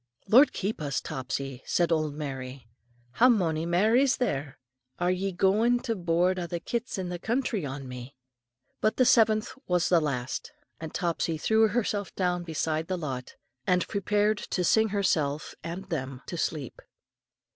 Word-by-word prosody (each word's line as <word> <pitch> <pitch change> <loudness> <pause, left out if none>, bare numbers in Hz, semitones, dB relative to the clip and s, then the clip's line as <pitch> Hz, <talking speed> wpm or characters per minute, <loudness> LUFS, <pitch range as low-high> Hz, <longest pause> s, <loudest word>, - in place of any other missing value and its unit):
"Lord 255 +9 +7
keep 200 -2 -3
us, 140 -3 -1
Topsy," 130 0 -4
said 175 -1 +1
old 155 -3 0
Mary. 135 -3 -6 0.5
"How 245 - +5
mony 165 -8 +1
mair 195 +7 +3
is 265 0 +4
there? 145 - -2 0.4
Are 180 +1 +1
ye 190 +2 -1
goin' 210 +7 +3
to 230 - -2
board 180 0 +1
a' 175 - -3
the 170 0 -3
kits 235 +6 -3
in 185 -2 -3
the 175 -1 -4
country 225 - -1
on 135 0 -6
me?" 125 +2 -8 0.6
But 215 - +1
the 255 - +5
seventh 220 -2 +4 0.2
was 180 -1 +2
the 175 -2 +5
last, 130 -4 -3 0.3
and 160 -1 -6
Topsy 170 -2 -1
threw 220 +7 +3
herself 205 -2 -2
down 180 -2 0
beside 160 -1 -2
the 185 - -1
lot, 130 -6 -5 0.3
and 180 -1 +2
prepared 210 +1 +1
to 180 - -2
sing 220 +6 +4
herself 155 -8 0
and 175 +3 -5
them 135 -4 -4
to - - -6
sleep. 155 -5 -3
175 Hz, 165 wpm, -28 LUFS, 150-210 Hz, 0.6 s, Lord